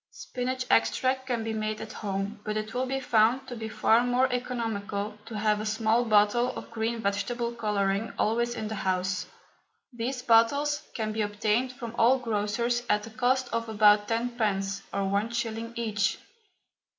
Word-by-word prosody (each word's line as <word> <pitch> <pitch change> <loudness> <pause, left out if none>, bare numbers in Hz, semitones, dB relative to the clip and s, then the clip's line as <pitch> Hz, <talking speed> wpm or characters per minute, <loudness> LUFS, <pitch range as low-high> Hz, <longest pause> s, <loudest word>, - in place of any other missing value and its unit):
Spinach 255 0 -4
extract 260 0 +2
can 240 -3 -1
be 225 0 -3
made 215 0 -2
at 220 0 -7
home, 200 +1 -3
but 215 0 -2
it 215 +1 -4
will 255 +1 -1
be 270 +1 -1
found 245 +1 +2
to 245 - -6
be 220 -1 -5
far 225 +2 +3
more 245 +1 +3
economical 220 -4 -3
to 220 - -5
have 210 0 +1
a - - -4
small 220 +2 +2
bottle 215 +3 +4
of - - -8
green 230 +1 -2
vegetable 235 +4 -1
colouring 210 -2 0
always 235 +2 +1
in 220 -2 -4
the 220 - -4
house. 185 -2 -1 0.7
These 250 +2 -3
bottles 280 +6 +3
can 215 -2 -2
be 220 0 -2
obtained 210 +4 0
from 235 -3 -7
all 245 +4 +5
grocers 235 +1 -1
at 210 0 +2
the 225 - -9
cost 250 +4 +1
of 230 0 -1
about 210 -1 +5
tenpence 215 -4 -1
or 200 - -1
one 200 +3 0
shilling 230 -1 -3
each. 215 -3 0
225 Hz, 170 wpm, -28 LUFS, 210-245 Hz, 0.7 s, all